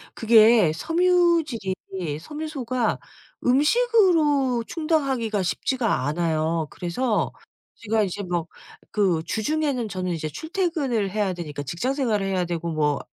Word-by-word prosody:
그게 220 Hz, -5 st, +5 dB
섬유질이 330 Hz, -, +1 dB, 0.5 s
섬유소가 260 Hz, -, -3 dB, 0.5 s
음식으로 300 Hz, -, +3 dB
충당하기가 270 Hz, -, 0 dB
쉽지가 225 Hz, -, -1 dB
않아요. 160 Hz, 0 st, 0 dB
그래서 210 Hz, +7 st, -1 dB, 0.4 s
제가 220 Hz, -1 st, 0 dB
이제 200 Hz, +1 st, -3 dB
뭐 175 Hz, -3 st, -2 dB, 0.4 s
그 190 Hz, -6 st, +1 dB
주중에는 255 Hz, -, -1 dB
저는 185 Hz, -2 st, -3 dB
이제 160 Hz, -2 st, -3 dB
출퇴근을 290 Hz, -, -2 dB
해야 205 Hz, -2 st, 0 dB
되니까 155 Hz, -5 st, -6 dB
직장 170 Hz, -, -2 dB
생활을 230 Hz, -8 st, 0 dB
해야 190 Hz, -2 st, 0 dB
되고 170 Hz, -1 st, -3 dB
뭐 150 Hz, -2 st, +1 dB
225 Hz, 280 characters per minute, -24 LUFS, 175-295 Hz, 0.5 s, 그게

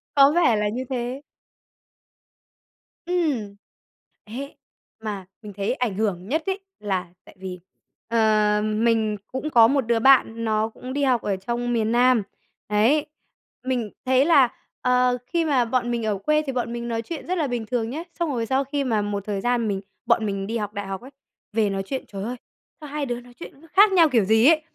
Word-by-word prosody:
Có 280 Hz, 0 st, +7 dB
vẻ 330 Hz, -10 st, +4 dB
là 210 Hz, 0 st, 0 dB
như 245 Hz, +5 st, -3 dB
thế. 250 Hz, +1 st, -3 dB, 1.8 s
Ừm, 300 Hz, -, -1 dB, 0.7 s
ấy, 260 Hz, +6 st, -7 dB, 0.5 s
mà 205 Hz, -3 st, -4 dB, 0.2 s
mình 210 Hz, -2 st, -9 dB
thấy 205 Hz, +4 st, 0 dB
ảnh 250 Hz, -6 st, -2 dB
hưởng 195 Hz, -3 st, -1 dB
nhất 315 Hz, +7 st, 0 dB
ấy 385 Hz, 0 st, -1 dB, 0.2 s
là 190 Hz, -4 st, -2 dB, 0.2 s
tại -, -, -16 dB
vì, 185 Hz, -1 st, -6 dB, 0.5 s
ờm, 215 Hz, -1 st, +2 dB
mình 220 Hz, -2 st, +2 dB
cũng 265 Hz, +4 st, -3 dB
có 230 Hz, -6 st, +7 dB
một 275 Hz, +3 st, +2 dB
đứa 230 Hz, 0 st, +2 dB
bạn 230 Hz, -2 st, +4 dB
nó 220 Hz, 0 st, +1 dB
cũng 255 Hz, +3 st, -8 dB
đi 285 Hz, +1 st, 0 dB
học 255 Hz, -4 st, +2 dB
ở 200 Hz, -, -1 dB
trong 240 Hz, +5 st, -2 dB
miền 225 Hz, -1 st, +1 dB
Nam, 245 Hz, -1 st, +4 dB, 0.5 s
đấy, 230 Hz, +9 st, +3 dB, 0.6 s
mình 245 Hz, -5 st, -2 dB
thấy 260 Hz, +1 st, +4 dB
là, 280 Hz, -7 st, +5 dB, 0.3 s
ờ, 250 Hz, 0 st, +3 dB
khi 335 Hz, +5 st, 0 dB
mà 270 Hz, -6 st, +2 dB
bọn 240 Hz, +1 st, 0 dB
mình 235 Hz, -2 st, -1 dB
ở 210 Hz, -2 st, 0 dB
quê 305 Hz, +10 st, +1 dB
thì 270 Hz, -, -2 dB
bọn 240 Hz, -2 st, -2 dB
mình 235 Hz, 0 st, -4 dB
nói 230 Hz, -1 st, -2 dB
chuyện 320 Hz, +7 st, -7 dB
rất 365 Hz, +1 st, -1 dB
là 310 Hz, -4 st, 0 dB
bình 240 Hz, -3 st, -3 dB
thường 230 Hz, -1 st, -2 dB
nhá, 305 Hz, +7 st, -4 dB, 0.2 s
xong 340 Hz, -2 st, 0 dB
rồi 235 Hz, -4 st, -1 dB
sau 265 Hz, +4 st, +1 dB
khi 280 Hz, +1 st, -2 dB
mà 225 Hz, -5 st, +1 dB
một 205 Hz, -1 st, -3 dB
thời 200 Hz, -2 st, -2 dB
gian 240 Hz, -1 st, +1 dB
mình 195 Hz, -2 st, -2 dB, 0.2 s
bọn 220 Hz, -, +2 dB
mình 195 Hz, -1 st, -3 dB
đi 230 Hz, +2 st, -2 dB
học 210 Hz, -2 st, -4 dB
đại 205 Hz, -1 st, -5 dB
học 195 Hz, +1 st, -5 dB
ấy, 260 Hz, +3 st, -12 dB, 0.4 s
về 215 Hz, -1 st, +2 dB
nói 195 Hz, 0 st, -2 dB
chuyện, 265 Hz, +6 st, -4 dB
trời 195 Hz, -1 st, -6 dB
ơi, 240 Hz, +4 st, -3 dB, 0.5 s
sao 300 Hz, -, -8 dB
hai 295 Hz, 0 st, -2 dB
đứa 240 Hz, -2 st, -3 dB
nói 245 Hz, 0 st, -16 dB
chuyện 275 Hz, -, -11 dB
nó 330 Hz, -, -17 dB
khác 405 Hz, +2 st, +7 dB
nhau 340 Hz, -4 st, +5 dB
kiểu 235 Hz, -6 st, +3 dB
gì 220 Hz, +3 st, +4 dB
ấy. 315 Hz, 0 st, +5 dB
235 Hz, 205 wpm, -24 LUFS, 215-270 Hz, 1.8 s, Có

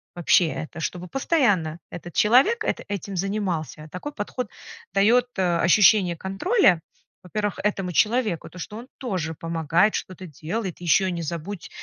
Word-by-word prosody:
вообще. 175 Hz, 0 st, +4 dB
Это, 155 Hz, +1 st, -6 dB
чтобы 180 Hz, +2 st, -4 dB
постоянно 200 Hz, -, +1 dB
этот 175 Hz, -1 st, -8 dB
человек 270 Hz, -, +4 dB
эт -, -, 0 dB
этим 200 Hz, -1 st, -5 dB
занимался. 175 Hz, -6 st, -3 dB
Такой 290 Hz, +11 st, -6 dB
подход 220 Hz, +1 st, -4 dB, 0.4 s
даёт, 230 Hz, +5 st, +4 dB
э, 175 Hz, -2 st, +2 dB
ощущение 185 Hz, 0 st, +5 dB
контроля, 195 Hz, -, +2 dB, 0.4 s
во-первых, 205 Hz, +3 st, -3 dB
этому 195 Hz, -3 st, -1 dB
человеку, 215 Hz, -, +1 dB
то, -, -, -14 dB
что 210 Hz, +4 st, -7 dB
он 240 Hz, +3 st, -9 dB
тоже 185 Hz, -, -3 dB
помогает, 165 Hz, +5 st, +1 dB
что-то 185 Hz, 0 st, -6 dB
делает, 175 Hz, -, -5 dB
ещё 185 Hz, +3 st, +3 dB
не 170 Hz, -, -3 dB
забудь 170 Hz, +4 st, -5 dB
190 Hz, 140 wpm, -24 LUFS, 170-215 Hz, 0.4 s, ощущение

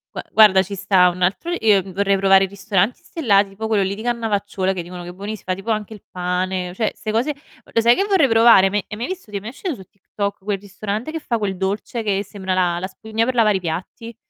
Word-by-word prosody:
Gua -, -, -4 dB
guarda 205 Hz, -4 st, +6 dB
ci 200 Hz, +2 st, -7 dB
sta 190 Hz, -2 st, +4 dB
un 180 Hz, +1 st, -7 dB
altro 200 Hz, -, 0 dB
io, 210 Hz, -3 st, +4 dB
mhmm, 190 Hz, -, -10 dB
vorrei 200 Hz, +1 st, +1 dB
provare 195 Hz, 0 st, +5 dB
i -, -, -7 dB
ristoranti 200 Hz, +3 st, -1 dB
stellati, 205 Hz, -11 st, +2 dB
tipo 205 Hz, +3 st, -5 dB
quello 215 Hz, -3 st, +2 dB
lì 195 Hz, +1 st, -2 dB
di 215 Hz, -, -8 dB
Cannavacciuolo 205 Hz, -5 st, -1 dB
che 185 Hz, -, -3 dB
dicono 175 Hz, +1 st, -9 dB
che 175 Hz, -, -8 dB
è -, -, -6 dB
buonissim 200 Hz, +3 st, -7 dB
fa 185 Hz, -, 0 dB
tipo 195 Hz, +5 st, -4 dB
anche 215 Hz, 0 st, -2 dB
il 210 Hz, -, -13 dB
pane, 180 Hz, 0 st, -2 dB
cioè 215 Hz, +3 st, -1 dB
ste 215 Hz, 0 st, -4 dB
cose 245 Hz, +7 st, 0 dB, 0.3 s
lo 230 Hz, -, 0 dB
sai 235 Hz, +1 st, +5 dB
che 390 Hz, -, +1 dB
vorrei 365 Hz, -, +3 dB
provare, 225 Hz, -4 st, +6 dB
me 205 Hz, 0 st, -1 dB
hai 210 Hz, -, -6 dB
mai 235 Hz, -, -3 dB
visto 370 Hz, -, -7 dB
ti 210 Hz, -, -9 dB
è -, -, -3 dB
mai 215 Hz, -, -6 dB
uscito 310 Hz, +5 st, -5 dB
su 190 Hz, -, -12 dB
TikTok 200 Hz, +1 st, -5 dB
quel 200 Hz, 0 st, -2 dB
ristorante 205 Hz, +6 st, -5 dB
che 325 Hz, -, -4 dB
fa 240 Hz, -5 st, -2 dB
quel 200 Hz, -3 st, -3 dB
dolce 200 Hz, +5 st, -3 dB
che 200 Hz, -2 st, 0 dB
sembra 190 Hz, -2 st, -4 dB
la 175 Hz, -2 st, +1 dB
la 185 Hz, -, -3 dB
spugna 220 Hz, +3 st, -3 dB
per 255 Hz, +1 st, -2 dB
lavare 215 Hz, -4 st, +4 dB
i -, -, -5 dB
piatti? 185 Hz, +7 st, -6 dB
200 Hz, 255 wpm, -20 LUFS, 190-225 Hz, 0.3 s, guarda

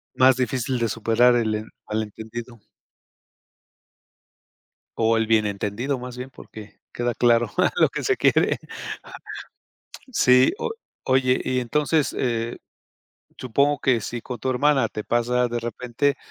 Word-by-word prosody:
Más 130 Hz, 0 st, +6 dB
difícil 130 Hz, 0 st, -1 dB
de 115 Hz, -, +1 dB
superar 115 Hz, +3 st, +3 dB
el 110 Hz, -2 st, +1 dB
en 110 Hz, +1 st, -5 dB, 0.2 s
mal 110 Hz, +1 st, -1 dB
entendido. 115 Hz, +3 st, -8 dB, 2.4 s
O 115 Hz, 0 st, +3 dB
el 115 Hz, -1 st, +1 dB
bien 110 Hz, -1 st, +3 dB
entendido, 105 Hz, +7 st, -2 dB
más 125 Hz, 0 st, -8 dB
bien, 130 Hz, +1 st, -7 dB
porque 110 Hz, -2 st, -13 dB
queda 120 Hz, 0 st, -2 dB
claro 120 Hz, -1 st, +3 dB, 0.3 s
lo -, -, +6 dB
que -, -, -5 dB
se 400 Hz, -2 st, +1 dB
quiere. -, -, +3 dB, 1.5 s
Sí, 125 Hz, -, +5 dB
o -, -, -2 dB, 0.3 s
oye, 130 Hz, -1 st, +2 dB
y 130 Hz, 0 st, 0 dB
entonces, 150 Hz, +5 st, 0 dB
eh, 115 Hz, -2 st, -1 dB, 0.8 s
supongo 140 Hz, +4 st, +1 dB
que 125 Hz, -5 st, +1 dB
si 120 Hz, +4 st, -5 dB
con 125 Hz, +1 st, -7 dB
tu 130 Hz, +4 st, -2 dB
hermana 135 Hz, -1 st, +2 dB
te 105 Hz, -, -6 dB
pasa 120 Hz, +1 st, +1 dB
de 120 Hz, -, -2 dB
repente, 120 Hz, +4 st, -1 dB
120 Hz, 135 wpm, -23 LUFS, 115-130 Hz, 2.4 s, Más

